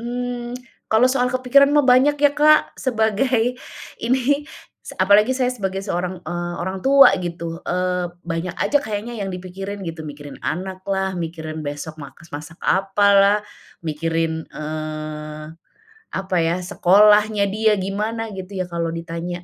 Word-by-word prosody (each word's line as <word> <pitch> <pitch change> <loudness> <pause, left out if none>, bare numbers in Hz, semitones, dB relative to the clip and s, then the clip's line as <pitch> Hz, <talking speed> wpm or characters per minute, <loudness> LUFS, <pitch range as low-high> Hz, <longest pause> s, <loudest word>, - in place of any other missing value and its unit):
mmm, 245 0 -4 0.4
kalau 220 +3 +5
soal 250 -1 +1
kepikiran 260 +2 +4
mah 295 -3 +4
banyak 260 +4 +5
ya 290 -1 +5
Kak, 305 +1 +4
sebagai 240 +1 +1 0.5
ini, 265 +4 +1 0.4
s - - -8
apalagi 205 +5 +5
saya 255 -1 0
sebagai 195 -3 -3
seorang, 180 -2 -3
eee, 175 0 -4
orang 190 +2 -3
tua 275 0 +7
gitu. 170 -1 -5
Eee, 180 -1 -1
banyak 170 +1 -4
aja 290 - +2
kayaknya 220 +2 -4
yang 195 - -4
dipikirin 195 +2 -6
gitu, 160 -1 -6
mikirin 145 -1 -9
anak 185 +2 -4
lah, 190 -1 -1
mikirin 160 -2 -5
besok 145 +2 -6
makas 155 +3 -12
masak 155 +3 -8
apalah, 200 +1 +3 0.4
mikirin, 165 0 -2
eee, 155 0 -6 0.7
apa 190 -1 -1
ya, 165 +1 +1
sekolahnya 210 +3 +4
dia 215 +1 +2
gimana 210 +3 -3
gitu 190 +1 -8
ya, 185 -1 -1
kalau 170 -1 -1
ditanya, 170 +1 -5
190 Hz, 140 wpm, -21 LUFS, 165-225 Hz, 0.7 s, tua